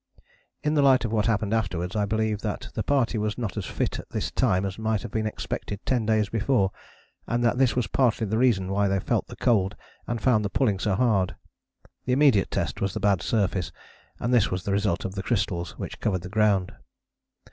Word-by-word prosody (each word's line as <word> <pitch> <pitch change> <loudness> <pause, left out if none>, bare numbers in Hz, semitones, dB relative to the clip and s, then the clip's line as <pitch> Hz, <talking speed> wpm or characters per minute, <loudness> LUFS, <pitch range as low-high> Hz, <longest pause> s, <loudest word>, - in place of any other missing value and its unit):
In 150 - +1
the 150 - +3
light 130 -3 +5
of 110 - -3
what 110 -1 +1
happened 110 -2 0
afterwards 90 -4 -1
I 105 -1 +1
believe 110 0 -1
that 105 -2 -4
the - - -2
party 125 -3 +1
was 105 0 -2
not 115 -6 -3
as - - -4
fit - - -2
at - - -10
this - - -3
time 100 -7 +1
as 95 +1 -5
might 110 -1 -1
have 120 - -7
been 110 -1 -1
expected 100 -1 -5
ten 120 -5 0
days 110 -2 +2
before, 110 -2 +1 0.6
and 120 +1 0
that 120 +1 +2
this 130 -3 +3
was 125 -2 +1
partly 120 -4 +1
the 110 +2 -1
reason 100 -7 +2
why 100 +1 +2
they 95 0 +1
felt - - -1
the - - -9
cold 105 -5 +1 0.3
and 120 0 -2
found 110 -3 +3
the 100 - -1
pulling 105 -5 +1
so 100 0 0
hard. 100 -5 +1 0.7
The 125 - +1
immediate 130 - +4
test - - -2
was 100 -1 -1
the - - -1
bad 100 -3 +2
surface, 95 - 0 0.5
and 120 - -1
this 120 -4 +4
was 90 0 -3
the 100 - -2
result 100 -3 0
of 95 - -4
the 95 - -3
crystals 90 -6 -2
which - - -6
covered 95 -4 -1
the 90 - -7
ground. 105 -3 +2
105 Hz, 220 wpm, -26 LUFS, 95-120 Hz, 0.7 s, light